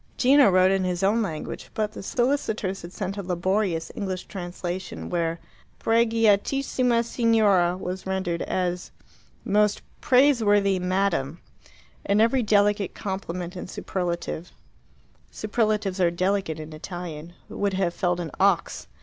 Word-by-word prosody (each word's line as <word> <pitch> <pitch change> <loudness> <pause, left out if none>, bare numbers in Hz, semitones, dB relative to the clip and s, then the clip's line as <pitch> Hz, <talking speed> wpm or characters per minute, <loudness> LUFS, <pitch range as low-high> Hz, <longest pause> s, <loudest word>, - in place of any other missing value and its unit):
Gino 275 -1 +6
wrote 185 0 +4
in 195 -1 +1
his 180 0 -2
own 210 +4 +3
language, 160 -8 -5
but 215 -1 -1
the - - -8
solicitors 220 -4 -1
had 170 - -9
sent 195 +1 -4
a - - -2
laborious 185 -1 -1
English 190 -3 -4
translation, 180 -1 -6
where 165 -1 -1 0.4
"Preghiatissima 230 +2 +2
Signora" 210 -7 +3
was 185 0 -5
rendered 190 -3 -2
as 180 -1 -2 0.6
"Most 210 0 +2 0.2
Praiseworthy 215 -8 +4
Madam," 180 -5 0 0.6
and 200 +1 +2
every 230 +4 +3
delicate 205 -2 +2
compliment 180 -2 -5
and 180 - -7
superlative 175 -3 -4 0.8
superlatives 215 -3 -1
are 175 - +4
delicate 185 -2 -1
in 155 0 -8
Italian 170 0 -7
would 200 -1 -2
have 185 -3 0
felled 180 -2 0
an 165 -3 -4
ox. 195 -3 +1
190 Hz, 125 wpm, -25 LUFS, 175-215 Hz, 0.8 s, Gino